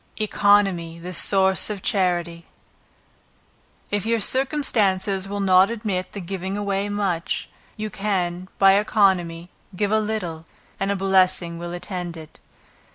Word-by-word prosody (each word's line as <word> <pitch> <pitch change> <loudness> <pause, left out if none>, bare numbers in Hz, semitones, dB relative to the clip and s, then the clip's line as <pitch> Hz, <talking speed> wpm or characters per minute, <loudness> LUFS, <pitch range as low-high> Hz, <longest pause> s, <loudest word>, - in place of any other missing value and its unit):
Economy 200 -5 +2
the 180 +2 -7
Source 190 +1 +3
of 205 -3 -5
Charity. 175 -4 -1 1.4
If 205 -2 0
your 230 0 +1
circumstances 205 -7 +1
will 205 +1 -4
not 190 0 +5
admit 210 -6 -3
of 195 -3 -6
giving 190 +1 -4
away 200 0 -2
much, 195 -5 -2 0.3
you 215 0 -4
can, 185 -3 -2
by 195 0 +6
economy, 180 -5 +1 0.2
give 205 +2 -1
a 220 - +3
little, 180 -7 -4 0.3
and 195 - -1
a - - 0
blessing 185 -3 +2
will 170 0 -6
attend 175 -1 -5
it. 155 -1 -13
190 Hz, 130 wpm, -23 LUFS, 175-205 Hz, 1.4 s, by